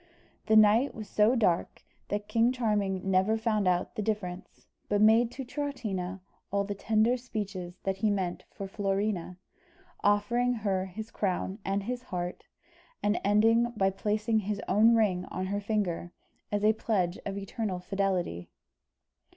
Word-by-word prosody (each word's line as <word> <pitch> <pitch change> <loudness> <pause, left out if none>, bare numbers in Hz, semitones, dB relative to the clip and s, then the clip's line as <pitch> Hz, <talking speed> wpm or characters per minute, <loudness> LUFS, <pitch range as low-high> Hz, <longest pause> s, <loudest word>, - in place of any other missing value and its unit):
The 220 - +4
night 215 +5 +5
was 215 -3 -7
so 215 +5 +3
dark 185 -8 0 0.2
that 205 0 -3
King 230 +1 +3
Charming 205 -6 0
never 190 +4 +3
found 215 -3 0
out 180 0 +1
the 220 - -3
difference, 195 -4 -4 0.2
but 205 - +2
made 225 +3 +5
to 265 0 -6
Troutina 215 -10 -4 0.3
all 200 0 +1
the 205 +1 -3
tender 220 +4 +2
speeches 200 -7 -5
that 195 0 -1
he 215 +2 +1
meant 190 -3 -1
for 195 - -7
Florina, 195 -2 -2 0.7
offering 235 +5 +2
her 195 -4 -1
his 215 +4 -8
crown 190 +1 -2
and 195 +1 -1
his 245 +3 -3
heart, 180 -7 -5 0.6
and 205 +2 +1
ending 225 +4 +3
by 195 -1 +3
placing 215 +3 0
his 205 0 -3
own 220 +4 +5
ring 190 -5 +2
on 185 +1 -4
her 200 +2 -2
finger, 200 -5 -1 0.4
as 205 0 0
a 215 +1 +5
pledge 195 -5 -1
of 200 0 -4
eternal 200 -1 -3
fidelity. 180 - -2
205 Hz, 150 wpm, -29 LUFS, 190-220 Hz, 0.7 s, night